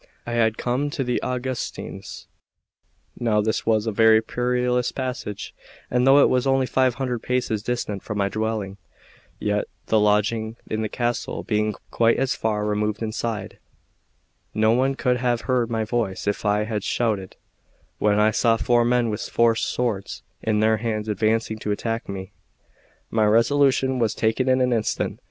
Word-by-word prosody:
I 120 - -5
had 115 -2 +2
just - - -25
come 130 +4 0
to 140 -1 -2
the 125 -1 -1
Augustines 125 0 -5 0.9
now 110 -3 +2
this 110 +1 -1
was 110 -1 +2
a 110 - 0
very 110 +1 +5
perilous 125 +1 0
passage, 125 -6 -5 0.4
and 125 +1 +2
though 135 +1 +7
it - - +5
was 130 +1 +1
only 135 0 +3
five 130 -1 +2
hundred 125 -2 -2
paces 125 -4 -1
distant 105 -4 -3
from 105 - -5
my 100 -1 +1
dwelling, 110 -2 -3 0.6
yet 105 0 -1 0.2
the 110 - +3
lodging 105 +2 +1
in 110 - -2
the 110 - -2
castle 120 +1 -2
being 105 -1 0 0.2
quite 115 0 +3
as 135 -1 +1
far 105 -1 -1
removed 105 +1 -1
inside, 110 -2 -4 1.0
no 110 +1 +3
one 130 +3 +2
could 125 -3 +1
have 120 -2 0
heard 125 -2 0
my 115 -1 -1
voice 110 -4 -2
if 100 +1 -2
I 105 +1 +2
had 105 -2 -3
shouted 105 -6 -1 0.6
when 105 0 +3
I 105 +1 +4
saw 115 0 +2
four 120 +1 +3
men 120 -1 +2
with 105 +1 -3
four 115 -1 +2
swords 115 -3 -2 0.2
in 110 -1 +1
their 110 0 +3
hands 110 -1 -3
advancing 110 +1 0
to 105 - -3
attack 115 +2 -3
me. 95 0 -6 0.8
My 110 -1 +2
resolution 130 +4 +3
was 115 -2 +1
taken 115 +4 +1
in 130 0 +3
an 125 -1 +2
instant. 110 -2 -1
115 Hz, 170 wpm, -23 LUFS, 105-125 Hz, 1.0 s, though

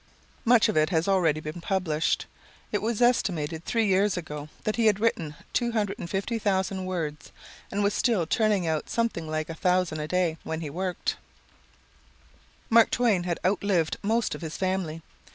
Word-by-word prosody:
Much 235 -1 +6
of - - -1
it 155 0 +3
has 165 -1 +1
already 175 -6 +3
been 155 +2 -6
published. 170 -4 0 0.5
It 210 - 0
was 230 +1 0
estimated 165 -10 +1
three 230 -2 +1
years 195 0 +2
ago 150 -3 -6
that 215 - 0
he 230 -2 +3
had 210 - +5
then 210 - -6
written 165 -9 0 0.2
250,000 200 -3 -1
words, 160 -5 -4 0.4
and 205 +1 -1
was 200 0 +2
still 220 -9 +2
turning 210 0 +2
out 160 -2 -1
something 225 -9 -1
like 155 0 -2
1,000 180 0 +1
a 150 - -3
day, 175 -1 +1
when 160 0 -4
he 150 -3 -5
worked. 180 +2 -2 1.5
Mark 230 0 +6
Twain 215 -8 +2
had 175 -2 -1
outlived 185 -4 +1
most 225 +2 +1
of - - -7
his 160 -1 -5
family. 185 -4 -2
185 Hz, 160 wpm, -27 LUFS, 160-210 Hz, 1.5 s, Much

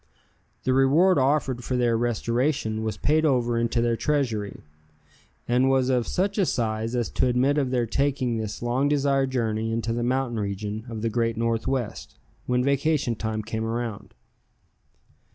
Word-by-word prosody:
The 130 - +1
reward 145 +7 +4
offered 130 -2 +1
for 125 - -1
their 120 -2 +2
restoration 120 0 0
was 110 -2 -3
paid 155 +6 +2
over 120 -5 +2
into 115 0 0
their 120 -1 +1
treasury, 115 -8 -1 0.8
and 125 +2 +3
was 130 -1 +2
of 125 -3 +1
such 200 +3 -1
a 195 - +4
size 115 -1 -1
as 120 -2 0
to 130 - +1
admit 130 +4 +2
of 135 -3 0
their 125 -2 +1
taking 130 -1 0
this 110 +1 -5
long 130 +4 +1
desired 140 -2 +2
journey 115 -3 -1
into 115 0 -1
the 120 - -2
mountain 125 -1 0
region 105 +2 -4
of 110 -2 -6
the 115 - +1
Great 115 0 0
Northwest, 115 - -2 0.3
when 125 0 +1
vacation 140 -1 +1
time 110 -1 -3
came 110 0 -3
around. 115 -2 -4
120 Hz, 160 wpm, -25 LUFS, 115-135 Hz, 0.8 s, reward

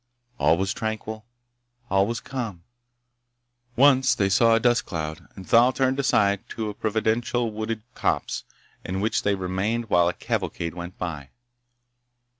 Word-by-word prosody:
All 80 - +4
was 95 +1 -1
tranquil. 110 0 -5 0.6
All 95 +1 +3
was 115 +1 -2
calm. 115 -12 -5 1.1
Once 130 0 +5
they 100 -1 +1
saw 115 +4 +5
a - - +3
dust 120 0 +3
cloud, 80 -3 -5
and 95 - -10
Thal 120 +2 +6
turned 130 0 0
aside 100 -7 +2
to 110 -2 -3
a - - -10
providential 110 +3 0
wooded 110 0 -4
copse, - - -1 0.4
in 95 +1 -3
which 110 +3 0
they 100 -1 +1
remained 100 +5 -2
while 85 -1 +4
a - - -3
cavalcade 85 -1 -3
went 85 +1 -8
by. 75 -6 -5
110 Hz, 145 wpm, -25 LUFS, 95-115 Hz, 1.1 s, Thal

